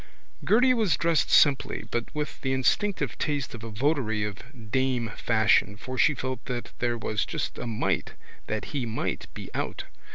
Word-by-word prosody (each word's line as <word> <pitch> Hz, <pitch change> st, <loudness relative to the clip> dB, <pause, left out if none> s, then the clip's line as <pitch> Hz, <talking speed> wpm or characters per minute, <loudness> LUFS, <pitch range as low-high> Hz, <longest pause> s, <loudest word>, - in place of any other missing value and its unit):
Gerty 250 Hz, +4 st, +5 dB
was 210 Hz, -, +2 dB
dressed 165 Hz, -2 st, +2 dB
simply 140 Hz, -3 st, +4 dB
but 120 Hz, 0 st, 0 dB
with 150 Hz, -1 st, -4 dB
the 130 Hz, -1 st, 0 dB
instinctive 185 Hz, +10 st, +1 dB
taste 145 Hz, -3 st, -1 dB
of 115 Hz, -2 st, -8 dB
a 115 Hz, -, -5 dB
votary 110 Hz, -2 st, 0 dB
of 110 Hz, +2 st, -8 dB
Dame 130 Hz, -3 st, +1 dB
Fashion 110 Hz, -3 st, +3 dB
for 130 Hz, +4 st, -6 dB
she 140 Hz, +4 st, +4 dB
felt 130 Hz, -1 st, -4 dB
that 125 Hz, -2 st, -4 dB
there 120 Hz, -1 st, 0 dB
was 110 Hz, -1 st, -1 dB
just -, -, -4 dB
a -, -, -4 dB
might 110 Hz, -2 st, -1 dB, 0.3 s
that 110 Hz, 0 st, -2 dB
he 130 Hz, -5 st, -1 dB
might 110 Hz, -, -3 dB
be -, -, -8 dB
out. -, -, -3 dB
125 Hz, 170 wpm, -27 LUFS, 110-145 Hz, 0.3 s, Gerty